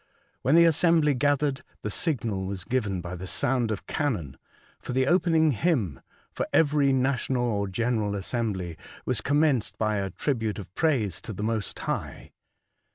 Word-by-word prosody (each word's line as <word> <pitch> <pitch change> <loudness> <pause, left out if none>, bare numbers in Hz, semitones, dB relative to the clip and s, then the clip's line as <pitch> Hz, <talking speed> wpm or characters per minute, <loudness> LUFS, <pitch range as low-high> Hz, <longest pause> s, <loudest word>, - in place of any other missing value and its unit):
When 135 +6 +3
the 170 0 +7
assembly 165 -2 +4
gathered, 145 +1 +1 0.2
the 105 - -2
signal 110 - -1
was 95 -2 -4
given, 105 -7 -1
by 90 +1 -6
the 95 +1 -7
sound 120 +3 +1
of 105 -3 -4
cannon, 100 - -2 0.4
for - - -6
the 130 +1 +2
opening 165 -1 +3
hymn 115 - 0 0.3
(for - - -2
€very 145 -3 +3
national 130 -1 +1
or 105 -4 0
general 110 +1 -1
assembly 95 -5 -3 0.3
was - - +1
com 145 +2 +2
menced 140 -8 +1
by 110 -1 0
a 100 -1 -2
tribute 110 - -2
of 95 -4 -9
praise 120 - 0
to 110 - -6
the 105 - -5
Most 110 -2 -2
High). - - -4
120 Hz, 160 wpm, -27 LUFS, 100-145 Hz, 0.4 s, the